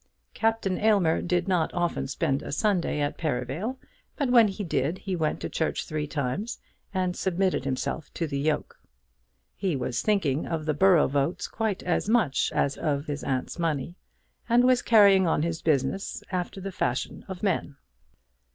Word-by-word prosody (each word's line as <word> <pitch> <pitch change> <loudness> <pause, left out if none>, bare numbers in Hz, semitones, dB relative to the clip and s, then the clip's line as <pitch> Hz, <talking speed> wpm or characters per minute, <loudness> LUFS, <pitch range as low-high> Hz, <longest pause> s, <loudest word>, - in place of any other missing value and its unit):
Captain 225 -4 0
Aylmer 200 -7 +3
did 175 0 0
not 180 -4 +1
often 175 -6 -1
spend 135 0 -1
a - - -7
Sunday 175 0 +1
at 145 - -2
Perivale, 155 - -2 0.4
but 275 -4 0
when 235 -3 +7
he 205 +1 -4
did, 155 0 -1
he 190 -1 -3
went 160 -3 -1
to - - -2
church 160 - -2
three 150 -1 -3
times, 150 - -3 0.3
and 185 -2 -1
submitted 185 -5 0
himself 135 +3 -3
to 170 - -1
the 140 -3 -3
yoke. 150 +1 -1 0.8
He 190 -5 -1
was 125 -2 -2
thinking 165 -10 +1
of 160 -2 -3
the 155 - +1
borough 180 0 +5
votes 140 +5 -1
quite 220 -4 -2
as 180 +3 0
much 220 - +2
as 140 - 0
of 145 -2 -1
his 145 -1 -4
aunt's 130 +5 -2
money, 165 0 -1 0.5
and 240 +1 +5
was 255 0 +4
carrying 200 -5 +6
on 160 - +1
his 165 -1 -2
business 155 +5 0
after 185 +1 -3
the 195 +1 -5
fashion 125 -8 -2
of 190 -1 -7
men. 180 -7 0
170 Hz, 170 wpm, -27 LUFS, 145-195 Hz, 0.8 s, when